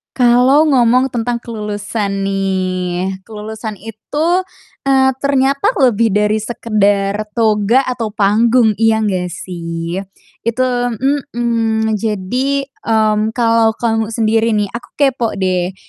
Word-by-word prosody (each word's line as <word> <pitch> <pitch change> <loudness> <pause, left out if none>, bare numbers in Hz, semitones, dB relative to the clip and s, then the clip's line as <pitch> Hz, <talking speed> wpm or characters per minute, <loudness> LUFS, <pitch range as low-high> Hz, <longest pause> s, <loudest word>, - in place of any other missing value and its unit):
Kalau 250 +4 +4
ngomong 255 0 +3
tentang 240 0 -2
kelulusan 210 -2 -4
nih, 190 -1 -2
kelulusan 220 0 -6
itu, 295 - -2 0.4
eee, 265 -1 +4
ternyata 280 - +1
lebih 230 -4 +3
dari 210 +1 +2
sekedar 210 -2 0
toga 220 +2 +2
atau 240 -5 -4
panggung, 220 +2 +3
iya 225 0 +3
gak 185 -4 -1
sih? 170 -1 -5 0.5
Itu 235 +2 0 0.7
mhm, 225 -2 0
jadi, 230 +7 -1
mmm, 220 -4 0
kalo 230 -2 +2
kamu 225 -1 -1
sendiri 225 0 +1
nih, 205 -2 0
aku 235 - -8
kepo 265 -5 0
deh, 185 -1 -1
220 Hz, 110 wpm, -16 LUFS, 205-240 Hz, 0.7 s, Kalau